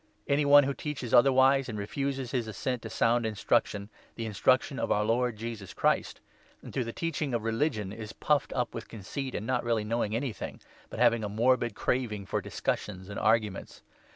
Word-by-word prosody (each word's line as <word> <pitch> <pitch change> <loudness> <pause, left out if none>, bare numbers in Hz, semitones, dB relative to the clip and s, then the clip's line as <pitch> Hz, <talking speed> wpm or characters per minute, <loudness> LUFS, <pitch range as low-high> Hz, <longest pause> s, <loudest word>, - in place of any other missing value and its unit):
Any 145 +1 +2
one 145 0 +8
who 140 +1 -1
teaches 135 -5 -5
otherwise, 135 +1 +5
and 110 - -4
3 100 - -3
refuses 135 +2 -3
his 120 -4 -1
assent 120 +3 -3
to - - -7
sound 120 +1 +2
instruction 105 0 0
— - - -30
the 115 - -4
in 110 - -5
struction 95 - +2
of - - -1
our 105 0 +2
Lord 120 0 +1
Jesus 110 -3 -6
Christ - - 0 0.2
— - - -31
and - - -10
to 130 - 0
the 115 - -5
teaching 150 -3 -2
of 115 - -2
religion, 115 -4 -1
is 110 -1 -7
puffed 150 -1 0
up 125 -2 -1
with 115 - -6
conceit, 125 +5 -5
not 125 +1 0
really 115 -2 +1
knowing 110 -1 -1
4 - - +1
anything, 125 -2 -5 0.3
but - - -8
having 115 -1 +4
a 105 - -2
morbid 120 +1 +2
craving 110 -5 -1
for - - -1
discussions 95 -2 -3
and 100 - -5
arguments. 110 -2 0
115 Hz, 205 wpm, -29 LUFS, 105-130 Hz, 0.3 s, one